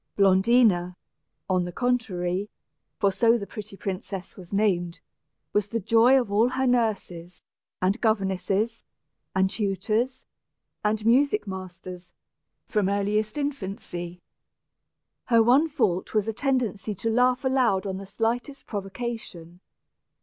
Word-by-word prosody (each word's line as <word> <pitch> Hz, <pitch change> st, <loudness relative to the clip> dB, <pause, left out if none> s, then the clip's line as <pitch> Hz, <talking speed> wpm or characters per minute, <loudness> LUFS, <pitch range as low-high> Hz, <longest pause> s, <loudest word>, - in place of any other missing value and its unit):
Blondina, 195 Hz, -2 st, +4 dB, 0.5 s
on 185 Hz, -1 st, +2 dB
the 175 Hz, -, -5 dB
contrary 200 Hz, -5 st, -1 dB, 0.5 s
for 200 Hz, -, +2 dB
so 230 Hz, +5 st, +3 dB
the 200 Hz, -, -5 dB
pretty 210 Hz, -1 st, -8 dB
princess 190 Hz, -1 st, -5 dB
was 180 Hz, -3 st, -12 dB
named 185 Hz, -4 st, 0 dB, 0.5 s
was 205 Hz, -1 st, +1 dB
the 230 Hz, +1 st, -2 dB
joy 230 Hz, +6 st, +5 dB
of 235 Hz, -5 st, -3 dB
all 220 Hz, +4 st, +4 dB
her 265 Hz, +1 st, -1 dB
nurses, 205 Hz, -8 st, -1 dB, 0.4 s
and 195 Hz, +5 st, +1 dB
governesses, 210 Hz, +1 st, 0 dB, 0.5 s
and 190 Hz, 0 st, +2 dB
tutors, 215 Hz, +5 st, -1 dB, 0.6 s
and 210 Hz, 0 st, 0 dB
music 280 Hz, -, +3 dB
masters, 185 Hz, -1 st, -8 dB, 0.5 s
from 205 Hz, -3 st, +1 dB
earliest 210 Hz, +3 st, 0 dB
infancy. 190 Hz, -10 st, -5 dB, 1.0 s
Her 230 Hz, -2 st, +5 dB
one 270 Hz, +8 st, +4 dB
fault 210 Hz, -, 0 dB
was 215 Hz, 0 st, +2 dB
a 225 Hz, -, -1 dB
tendency 225 Hz, -6 st, -1 dB
to 225 Hz, +5 st, -2 dB
laugh 250 Hz, +3 st, +2 dB
aloud 250 Hz, -8 st, +2 dB
on 190 Hz, -1 st, -3 dB
the 195 Hz, 0 st, -8 dB
slightest 240 Hz, +7 st, -2 dB
provocation. 195 Hz, -4 st, -6 dB
210 Hz, 120 wpm, -26 LUFS, 190-235 Hz, 1.0 s, joy